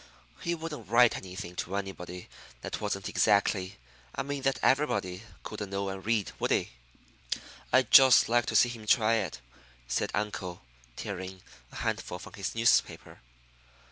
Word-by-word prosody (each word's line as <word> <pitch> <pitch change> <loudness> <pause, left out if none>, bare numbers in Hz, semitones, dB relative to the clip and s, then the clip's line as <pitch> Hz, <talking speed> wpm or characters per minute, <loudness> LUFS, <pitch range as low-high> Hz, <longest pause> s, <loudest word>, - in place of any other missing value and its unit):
"He 170 0 -1
wouldn't 155 - -7
write 120 +1 +5
anything 90 -1 -7
to 95 - -3
anybody 90 -2 -6 0.3
that - - -5
wasn't - - -2
exactly 100 -2 +2 0.4
I - - -1
mean 140 0 -4
that 135 -2 +1
everybody 100 -10 +1 0.2
couldn't 105 -2 -6
know 100 0 -2
and 95 0 -6
read, 110 -2 0
would - - 0
he?" - - +1 1.0
"I'd 130 0 +3
just 130 -2 +8
like 120 +1 +2
to - - -2
see 120 - +6
him 115 -3 -9
try 115 0 +4
it," 95 - -3 0.5
said - - -1
uncle, 100 -4 -4 0.3
tearing 95 -1 -6 0.3
a - - -13
handful 90 - -3
from 90 - -12
his 100 +1 -4
newspaper. 115 0 +1
105 Hz, 150 wpm, -29 LUFS, 95-120 Hz, 1.0 s, just